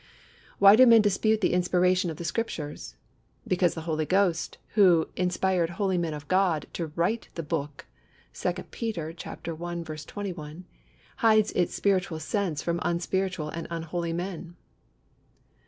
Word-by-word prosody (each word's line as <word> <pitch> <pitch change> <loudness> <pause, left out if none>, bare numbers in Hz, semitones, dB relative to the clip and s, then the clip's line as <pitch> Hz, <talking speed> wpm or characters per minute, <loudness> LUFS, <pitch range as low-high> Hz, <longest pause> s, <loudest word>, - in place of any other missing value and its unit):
Why 200 +1 +8
do 255 +3 +7
men 230 -2 +7
dispute 215 +2 +2
the 185 - +2
inspiration 180 0 +2
of 160 - -6
the 170 - -6
Scriptures? 155 -6 -4 0.5
Because 180 -2 +2
the 160 - -5
Holy 155 -2 -1
Ghost, 185 -3 +1
who 180 -6 +4
inspired 180 -1 +1
"holy 190 -4 +1
men 165 -3 -2
of 145 -1 -9
God" 185 -4 +2
to 170 - -3
write 195 +7 -1
the 165 - -4
Book 150 -2 -4 0.5
(2 180 - -1 0.2
Peter 195 -10 -3
i. - - -7
21), 170 0 -6 0.5
hides 215 -1 +4
its 175 - 0
spiritual 185 -5 0
sense 165 -2 -2
from 170 0 -1
unspiritual 175 -1 -1
and 165 +1 -6
unholy 170 0 -3
men. 175 0 -5
175 Hz, 140 wpm, -27 LUFS, 165-195 Hz, 0.5 s, Why